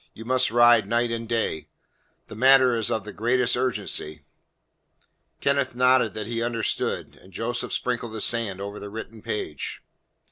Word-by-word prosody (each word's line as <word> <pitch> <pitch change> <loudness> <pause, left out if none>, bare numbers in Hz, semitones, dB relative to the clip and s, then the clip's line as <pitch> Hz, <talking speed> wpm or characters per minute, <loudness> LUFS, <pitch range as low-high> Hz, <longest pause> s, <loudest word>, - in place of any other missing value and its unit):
You 115 - -10
must 130 +1 +2
ride 120 -3 +5
night 115 +2 +1
and 115 -1 -4
day; 115 -9 -1 0.6
the - - -11
matter 130 +2 +5
is 115 -1 0
of 110 -3 -1
the 105 - -9
greatest 120 +2 +2
urgency." 100 - -2 1.2
Kenneth 140 -3 +1
nodded 125 -2 +3
that 110 -1 -4
he 115 +1 -3
understood, 115 -1 -2
and 95 - -17
Joseph 120 +6 -3
sprinkled 120 -2 -2
the 110 - -5
sand 110 -4 -1
over 100 +1 -6
the 100 - -8
written 110 +1 -8
page. 75 -10 -5
115 Hz, 155 wpm, -25 LUFS, 110-125 Hz, 1.2 s, ride